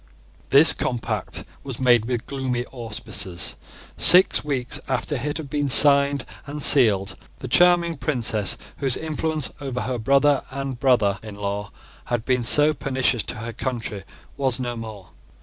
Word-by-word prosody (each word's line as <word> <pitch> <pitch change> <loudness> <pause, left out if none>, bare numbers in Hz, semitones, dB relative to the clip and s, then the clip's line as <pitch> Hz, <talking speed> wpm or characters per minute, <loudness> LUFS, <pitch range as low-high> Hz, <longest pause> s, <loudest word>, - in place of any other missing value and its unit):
This 145 +4 +7
compact 115 -5 -4 0.2
was 135 -4 -8
made 120 -3 +2
with 120 -1 -4
gloomy 130 -3 -4
auspices. 110 -7 -3 0.4
Six 180 +1 +7
weeks 135 -4 -2
after 130 +3 -3
it 145 +2 -4
had 160 -3 -8
been 145 +1 -3
signed 140 0 +5 0.2
and 145 +1 -7
sealed, 105 -9 +3 0.2
the 130 - -9
charming 170 +3 +2
princess, 120 -6 0 0.2
whose 135 -3 0
influence 155 -1 -3
over 130 -3 -5
her 125 +1 -4
brother 140 +4 +2
and 135 -1 -6
brother 110 -7 +1
in 110 -2 -10
law 100 0 -5 0.3
had 120 -2 -4
been 125 -2 0
so 150 +6 +5
pernicious 130 -4 -2
to - - -4
her 115 +2 -7
country, 115 -7 -5 0.3
was 135 -3 0
no 120 -1 -4
more. 110 -6 -10
130 Hz, 150 wpm, -21 LUFS, 115-140 Hz, 0.4 s, This